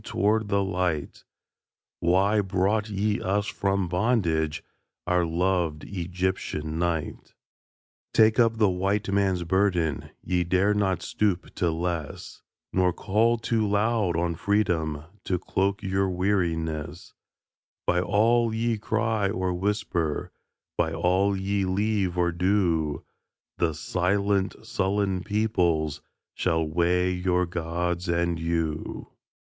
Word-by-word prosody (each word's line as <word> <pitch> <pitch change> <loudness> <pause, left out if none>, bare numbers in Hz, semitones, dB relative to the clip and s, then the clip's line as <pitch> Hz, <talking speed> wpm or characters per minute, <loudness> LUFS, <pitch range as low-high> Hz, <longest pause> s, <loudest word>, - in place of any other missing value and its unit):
toward 105 +2 +1
the 100 -1 +1
light: 90 -6 -2 0.8
"Why 95 +5 +3
brought 100 +3 0
ye 105 +1 0
us 100 +2 0
from 100 -1 -1
bondage, 85 -6 0 0.4
Our 90 -1 +2
loved 85 -2 0
Egyptian 90 -4 -3
night?" 85 -3 -3 0.8
Take 110 +1 +4
up 115 -1 +4
the 110 -2 +4
White 95 +3 0
Man's 95 -3 +1
burden 85 -4 0
Ye 90 -1 +1
dare 95 +4 +2
not 100 -3 0
stoop 100 -4 -1
to 90 - 0
less 85 -2 -4 0.3
Nor 90 -1 +2
call 110 +6 +2
too 110 -1 0
loud 105 -4 +1
on 85 0 0
Freedom 80 -6 0 0.2
To 90 - 0
cloak 95 +3 -1
your 95 0 0
weariness; 85 -5 -2 0.7
By 90 0 +2
all 115 +5 +3
ye 115 -1 0
cry 110 -1 0
or 95 -2 -1
whisper, 90 -4 -1 0.5
By 80 - +1
all 95 +4 +2
ye 100 +1 0
leave 95 -1 0
or 85 -1 +2
do, 85 -5 0 0.5
The 80 -3 +1
silent, 100 +5 0
sullen 100 -3 0
peoples 90 -8 0 0.3
Shall 80 -1 0
weigh 90 +3 +1
your 90 0 +1
Gods 85 +1 -2
and 85 0 0
you. 80 -2 -2
95 Hz, 115 wpm, -26 LUFS, 85-100 Hz, 0.8 s, Take